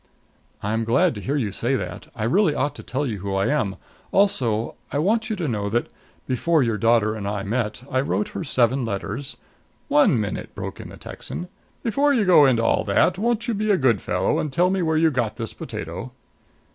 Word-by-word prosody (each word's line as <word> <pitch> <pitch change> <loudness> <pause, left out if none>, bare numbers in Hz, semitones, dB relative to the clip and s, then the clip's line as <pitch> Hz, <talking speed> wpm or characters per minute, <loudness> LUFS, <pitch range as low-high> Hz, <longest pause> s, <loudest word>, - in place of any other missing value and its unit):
"I'm 110 +3 0
glad 150 +10 +3
to 105 - -7
hear 140 +6 -1
you 115 -8 0
say 120 +7 0
that. 90 -7 -5
I 110 - -4
really 155 - +3
ought 145 +2 0
to - - -10
tell 140 +4 -2
you 110 -6 -3
who 100 +1 -3
I 95 0 +1
am. 130 -10 0 0.4
Also, 120 - +2 0.2
I - - -1
want 220 +8 +1
you 220 - 0
to 175 -5 -2
know 105 -5 -1
that, 120 +3 0 0.4
before 150 +4 +2
your 115 -3 0
daughter 115 -1 +3
and 105 -2 -5
I 100 -1 -2
met, 110 +1 -2
I 130 -1 +1
wrote 205 +9 -1
her 200 -3 -5
seven 130 -2 +2
letters 115 +6 -4 0.3
" - - -39
"One 210 - +5
minute," 105 -2 -4
broke - - -6
in - - -8
the - - -11
Texan. 180 - -7 0.3
"Before 280 +5 +2
you 220 -5 +2
go 175 -6 +7
into 120 -3 +2
all - - +2
that, 170 - +2
won't 235 +1 0
you 235 - +1
be 215 +1 -1
a 200 - +4
good 120 - +2
fellow - - 0
and 150 - -2
tell 175 +7 +3
me 190 -1 0
where 160 -2 +1
you 160 0 +4
got 120 -5 -1
this 115 -3 -5
potato?" - - -6
130 Hz, 220 wpm, -23 LUFS, 110-180 Hz, 0.4 s, go